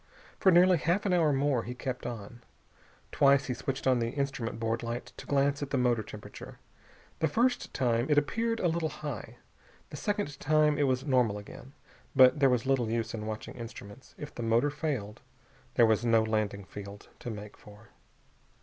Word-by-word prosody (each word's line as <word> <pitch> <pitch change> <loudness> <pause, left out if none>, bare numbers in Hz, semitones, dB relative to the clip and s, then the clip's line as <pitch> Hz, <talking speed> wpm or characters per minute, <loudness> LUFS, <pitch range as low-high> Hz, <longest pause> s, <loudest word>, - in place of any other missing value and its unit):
For 190 - +5
nearly 180 +1 +6
half 175 +7 0
an 190 - +2
hour 165 -4 +3
more 140 -2 +1
he 125 +2 -7
kept 125 -1 -4
on. 120 0 -8 0.7
Twice 140 0 +4
he 125 - -2
switched 135 +2 -4
on 130 -2 +3
the 115 0 0
instrument 135 -5 -3
board 115 0 -1
light 120 +1 -5
to - - -10
glance 140 0 +1
at 145 - -3
the 140 - 0
motor 120 -3 +2
temperature. 105 0 -10 0.6
The 160 - +2
first 245 - +1
time 120 -1 +1
it 150 - +3
appeared 230 +10 +1
a 180 - +2
little 165 -1 0
high. 150 -6 -7 0.5
The 145 - -6
second 205 -3 -2
time 150 0 +3
it 145 - +3
was 130 +1 0
normal 125 -7 +2
again. 115 +6 -11 0.4
But 130 +2 +7
there 135 -1 +5
was 125 -2 +1
little 130 -4 +1
use 115 -1 -2
in 110 -1 -5
watching 110 0 -5
instruments. 115 -1 -10
If 150 - -8
the - - -6
motor 115 +5 +2
failed 140 -9 -4 0.5
there 120 - +6
was 110 0 +2
no 115 -2 +4
landing 110 -3 -1
field 100 +1 -10
to - - -6
make 105 -2 -8
for. 105 +1 -16
130 Hz, 185 wpm, -30 LUFS, 115-145 Hz, 0.7 s, But